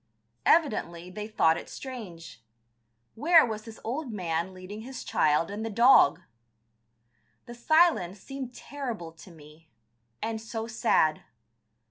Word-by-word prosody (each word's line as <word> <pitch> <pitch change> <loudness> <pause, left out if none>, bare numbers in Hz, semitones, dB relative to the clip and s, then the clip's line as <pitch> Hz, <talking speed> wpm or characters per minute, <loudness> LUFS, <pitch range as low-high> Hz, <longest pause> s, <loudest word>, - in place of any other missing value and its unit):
Evidently 180 - +1
they 210 +2 -6
thought 165 -7 +3
it - - -9
strange.... 175 - -9 0.7
Where 320 +6 +5
was 215 -2 -5
this 225 -1 -11
old 260 +3 -4
man 175 -3 -2
leading 185 +3 -9
his 255 +3 -8
child 155 +4 +1
and 210 +2 -5
the 225 - -3
dog? 230 - +5 1.2
The 240 - -9
silence 240 - +2
seemed 270 +2 -7
terrible 240 -11 -6
to 165 +3 -15
me, 155 0 -17 0.5
and 220 0 -3
so 225 0 -5
sad. 160 -8 +1
215 Hz, 125 wpm, -28 LUFS, 170-245 Hz, 1.2 s, Where